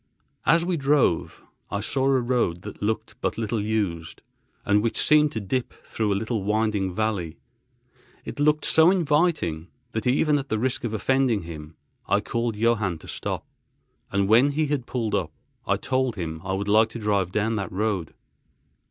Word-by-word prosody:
As 165 +1 +4
we 175 -1 0
drove, 140 - +1 0.3
I 100 - -2
saw 130 +5 0
a 135 -1 +4
road 120 -8 0
that - - -9
looked 110 +2 -2
but - - -1
little 110 -1 -1
used, 100 -7 -2 0.4
and 105 0 +3
which 115 +1 -1
seemed 150 -1 +4
to 110 - -2
dip 120 +5 -3
through 110 -2 -1
a - - +2
little, 110 +1 -2
winding 105 -2 0
valley. 95 -7 -2 0.9
It - - -7
looked 150 +1 +2
so 160 +1 +5
inviting 150 - +1 0.2
that, 110 +3 -3
even 145 +3 +3
at 135 - -7
the 110 - 0
risk 125 +3 -1
of 110 -2 -2
offending 130 -3 +1
him, 80 -1 -9 0.3
I - - +3
called 115 -1 -2
Johann 105 -5 +1
to - - -15
stop—and 100 0 -5
when 125 +7 +5
he 155 +2 +1
had 140 -4 -2
pulled 115 -4 -2
up, 80 -4 0 0.4
I - - +2
told 130 -2 -1
him 80 -4 -5
I 95 0 -2
would 100 +1 -2
like 110 +2 +4
to 115 - -7
drive 100 -4 0
down 110 +3 0
that 100 - -4
road. 100 -3 -2
110 Hz, 175 wpm, -25 LUFS, 100-130 Hz, 0.9 s, so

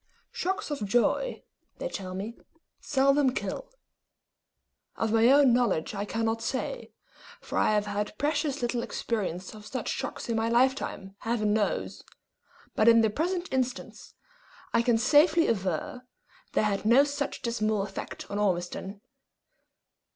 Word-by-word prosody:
Shocks 410 -6 -2
of 280 -7 -3
joy, 240 - +1 0.3
they - - -3
tell 185 - -6
me, 210 +5 -5 0.4
seldom 275 -1 +2
kill. - - -4 1.3
Of 225 -1 -1
my 225 +1 +5
own 275 -1 +6
knowledge 230 -10 +1
I 200 0 -3
cannot 225 +1 -1
say, 265 - -3 0.5
for - - -8
I - - +3
have 210 0 +1
had 210 +1 -3
precious 290 -2 -1
little 240 0 0
experience 190 -7 -3
of 210 -1 -11
such 255 - -4
shocks - - -4
in 230 - -1
my 225 +1 0
lifetime, 235 -5 0
Heaven 220 -2 0
knows; 210 -1 -1 0.7
but 215 - +3
in 230 0 +7
the 220 -1 +2
present 350 - -2
instance, 255 0 -3 0.6
I 230 - +4
can 235 -1 +3
safely 310 +7 +4
aver, 250 +6 -2 0.5
they - - +2
had 205 -2 0
no 235 +6 +6
such 285 0 -3
dismal 215 -3 0
effect 195 -1 -7
on 205 - -2
Ormiston. 190 +1 -2
235 Hz, 140 wpm, -28 LUFS, 210-275 Hz, 1.3 s, in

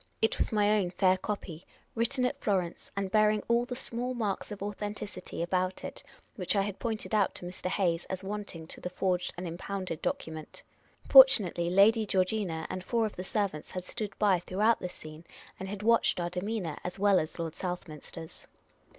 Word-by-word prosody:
It 220 - +1
was - - +1
my 210 0 +3
own 185 -3 0
fair 185 +1 +3
copy, 185 -4 -5 0.3
written 250 +3 +1
at 250 - -2
Florence, 185 -5 -1
and 195 -1 -1
bearing 215 0 +4
all 235 +1 +3
the 250 - -5
small 245 0 -4
marks 210 -3 -2
of 205 - -4
authenticit}'^ 205 -3 -5
about 185 +1 -1
it - - -7 0.4
which 185 +1 0
I 200 - +3
had 200 -1 -5
pointed 225 -2 -3
out 210 -3 +2
to - - -6
Mr. 180 +1 -5
Hayes 175 -3 0
as 190 0 -4
wanting 200 -5 -5
to - - -9
the 180 - -3
forged 180 0 0
and 180 0 -4
impounded 180 0 -4
document. 160 -1 -4 0.4
Fortunately, 200 - +7
Lady 210 +4 +5
Geor 185 -1 +3
gina 185 -6 -2
and 185 - -5
four 230 +3 +1
of 215 - -4
the 185 - -5
ser 205 +1 0
vants 155 -4 -10
had 185 -1 -4
stood 210 +1 -5
by 195 -4 +4
throughout 210 +6 +2
this 180 - -5
scene, 155 +1 -11 0.4
and 190 0 -5
had 205 0 -5
watched 230 -4 +4
our 175 0 -2
demean 200 +3 -2
o - - -2
u - - -4
r, - - -9
as 180 - -4
well 200 -1 +4
as 155 - -4
Lord 165 -2 -3
Southminster's. 165 -2 -7
190 Hz, 200 wpm, -30 LUFS, 180-210 Hz, 0.4 s, Fortunately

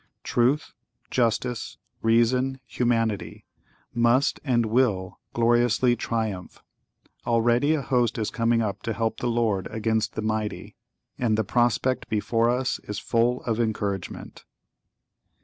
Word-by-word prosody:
Truth, 130 +5 +1 0.4
Justice, 120 -1 -1 0.2
Reason, 125 +4 +2
Humanity, 115 -4 -1 0.5
must 120 +4 +2
and 120 -5 +2
will 110 -5 0 0.2
gloriously 120 +1 +3
triumph. 110 -6 -4 0.6
Already 120 +5 +3
a 145 - -2
host 120 -2 +1
is 110 -2 -2
coming 115 0 +1
up 100 -2 -3
to 115 - -2
help 115 +1 -2
the 120 - -1
Lord 115 -5 0
against 110 0 -1
the 110 - -3
mighty, 110 -1 -3 0.4
and 115 -3 +1
the 110 - +2
prospect 120 +3 +1
before 115 +1 +1
us 125 +1 0
is 105 - -6
full 120 +4 +1
of 115 -1 -1
encouragement. 105 -4 -3
115 Hz, 120 wpm, -25 LUFS, 110-120 Hz, 0.6 s, gloriously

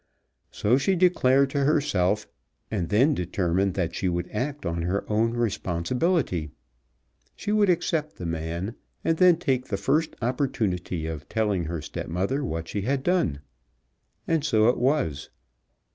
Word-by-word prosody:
So 120 +6 +2
she 190 +7 +2
declared 140 -7 +3
to 140 -1 0
herself, 105 - +1 0.4
and 90 -6 -2
then 130 +9 +4
determined 90 -1 0
that 85 -3 -1
she 95 - -1
would 85 0 -3
act 140 +5 -3
on 85 0 -1
her 90 +4 -1
own 115 +2 +1
responsibility. 115 - 0 0.9
She 210 - -4
would 210 -2 +3
accept 165 -3 0
the 90 - -7
man, 85 +5 -3 0.3
and 165 - +1
then 180 -2 +6
take 135 -6 0
the 100 - -2
first 150 +11 0
opportunity 110 - -1
of 75 -3 -6
telling 105 -6 0
her 80 -1 -4
stepmother 95 - -2
what 80 - -3
she 100 - -3
had 135 +5 -1
done. 155 - +1 0.9
And 165 -3 +1
so 115 -6 +4
it 125 - +1
was. 125 - 0
110 Hz, 145 wpm, -26 LUFS, 85-145 Hz, 0.9 s, then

